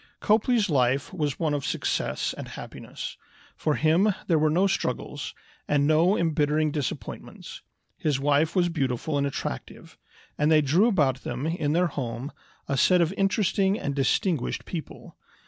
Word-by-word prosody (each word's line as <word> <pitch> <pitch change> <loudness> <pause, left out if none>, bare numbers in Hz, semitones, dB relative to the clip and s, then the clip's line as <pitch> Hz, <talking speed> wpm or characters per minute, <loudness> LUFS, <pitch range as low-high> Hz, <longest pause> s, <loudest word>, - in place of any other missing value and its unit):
Copley's 220 0 +2
life 135 0 +1
was 150 -6 -2
one 155 -3 0
of 145 -2 -2
success - - -1
and - - -7
happiness. - - -8 0.4
For 150 - 0
him 180 +6 +3
there 165 -3 +2
were 155 0 +3
no 175 +6 +3
struggles, 195 - -2 0.3
and 145 -1 +2
no 165 +6 +4
embittering 155 -1 +1
disappointments. 145 -3 -6 0.4
His 145 -4 0
wife 145 +4 +2
was 175 -2 +3
beautiful 140 -2 -1
and 140 0 +1
attractive, 65 - -6 0.4
and 150 +1 +3
they 155 -1 +6
drew 160 - +3
about 140 - +2
them, 125 +4 -4
in 160 -3 -1
their 175 +2 +3
home, 135 -3 -4 0.4
a 140 - -1
set 180 +6 +4
of 170 +1 +2
interesting 195 0 +1
and 140 - -2
distinguished 140 +2 0
people. 165 -4 -8
155 Hz, 150 wpm, -26 LUFS, 140-180 Hz, 0.4 s, they